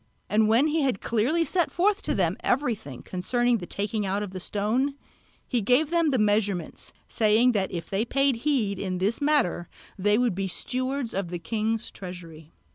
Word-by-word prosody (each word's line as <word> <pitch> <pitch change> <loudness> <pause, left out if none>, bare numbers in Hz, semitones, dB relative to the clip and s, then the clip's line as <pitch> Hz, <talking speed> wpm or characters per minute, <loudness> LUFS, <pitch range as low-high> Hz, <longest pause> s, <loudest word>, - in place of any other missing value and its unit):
And 215 0 +4
when 230 +6 +4
he 310 +1 +1
had 260 -8 0
clearly 255 +10 +1
set 350 -1 +1
forth 400 +4 +1
to - - -1
them - - +1
everything 215 - -1
concerning 240 +6 0
the 175 - -7
taking 205 +1 -2
out 200 +1 -1
of 200 - -6
the 185 - -6
stone, 225 +9 -1 0.5
he 245 - 0
gave 255 +9 +2
them 335 -2 +3
the 265 - +1
measurements, 200 - 0 0.2
saying 225 +3 +3
that 200 -4 -1
if 170 -3 -5
they 195 +2 0
paid 275 +1 +1
heed 230 -7 0
to 185 -2 -2
this 200 +8 -1
matter 285 - +1 0.3
they 205 +2 +3
would 245 -3 +2
be 195 +1 -2
stewards 255 +6 -3
of 195 -3 -2
the 175 - -3
king's 220 +5 -2
treasury. 170 -4 -10
220 Hz, 185 wpm, -26 LUFS, 190-260 Hz, 0.5 s, And